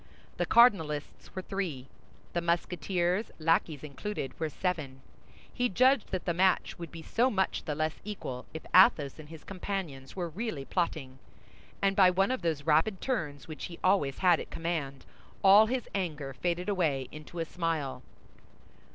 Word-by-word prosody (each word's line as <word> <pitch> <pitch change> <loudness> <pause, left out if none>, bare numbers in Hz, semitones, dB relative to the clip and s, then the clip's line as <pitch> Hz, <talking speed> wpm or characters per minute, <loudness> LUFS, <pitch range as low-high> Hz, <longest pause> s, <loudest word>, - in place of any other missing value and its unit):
The - - 0
cardinalists 160 -14 +3
were 185 - -4
three; 175 -11 -3 0.5
the 175 - 0
Musketeers, 175 +3 0
lackeys 160 -2 +1
included, 150 +1 -5
were 160 -1 -1
seven. 150 -7 -3 0.5
He 245 0 +1
judged 255 +3 +3
that 185 - -3
the 175 - +1
match 185 +1 +2
would 170 -3 -7
be 165 -1 -9
so 240 +9 +2
much 190 -5 -1
the 150 - -2
less 155 +1 -2
equal, 160 -12 -6
if 160 - -8
Athos 170 - +5
and 150 -1 -11
his 160 -2 -11
companions 180 -8 -5
were 175 -3 -3
really 170 -5 -4
plotting; 145 -7 -2 0.6
and 195 0 +3
by 190 -2 +7
one 195 +5 +2
of 260 - -2
those 160 -4 -1
rapid 160 +6 +2
turns 160 - -3
which 155 -1 -6
he 170 - -8
always 185 -8 +2
had 180 -3 +4
at - - -7
command, 155 -5 -3 0.4
all 200 +3 +8
his 250 +1 -2
anger 155 -8 -3
faded 175 +7 -2
away 155 -10 0
into 155 +3 -10
a 165 - -1
smile. 160 -7 -2
170 Hz, 160 wpm, -30 LUFS, 150-195 Hz, 0.6 s, all